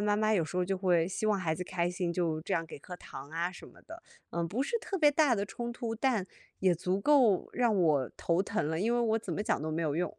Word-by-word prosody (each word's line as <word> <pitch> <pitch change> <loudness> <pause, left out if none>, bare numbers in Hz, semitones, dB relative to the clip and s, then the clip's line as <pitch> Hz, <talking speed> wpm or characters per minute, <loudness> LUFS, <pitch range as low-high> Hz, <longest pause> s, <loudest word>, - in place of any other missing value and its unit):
妈 205 0 +3
妈 215 0 +2
有 175 -6 +2
时 170 +4 -6
候 180 - +2
就 190 +1 -1
会 175 -3 +2
希 215 +3 -2
望 210 -2 +2
孩 160 -4 0
子 180 - -5
开 175 -1 -1
心， 175 -1 -2
就 165 -3 -1
这 190 - -1
样 165 - 0
给 160 - -9
颗 180 +5 -9
糖 140 -3 -10
啊 170 +2 -1
什 185 - -12
么 - - -17
的。 335 +1 -11 0.3
嗯， 170 0 -1
不 225 +10 -1
是 465 +10 -1
特 395 - -4
别 295 -2 +6
大 290 -4 +3
的 200 - -1
冲 240 +3 -5
突， 230 -1 -4
但 225 -5 0 0.3
也 185 -2 +4
足 185 +3 -1
够 245 -7 +4
让 235 -3 +2
我 150 -8 +2
头 170 +2 +1
疼 205 -6 -1
了， 160 0 -1
因 230 +4 +1
为 240 - +2
我 225 -1 +2
怎 - - -6
么 205 - -2
讲 215 - 0
都 155 - -3
没 160 +2 -1
有 155 -1 -1
用。 180 - -1
185 Hz, 300 characters per minute, -31 LUFS, 170-225 Hz, 0.3 s, 别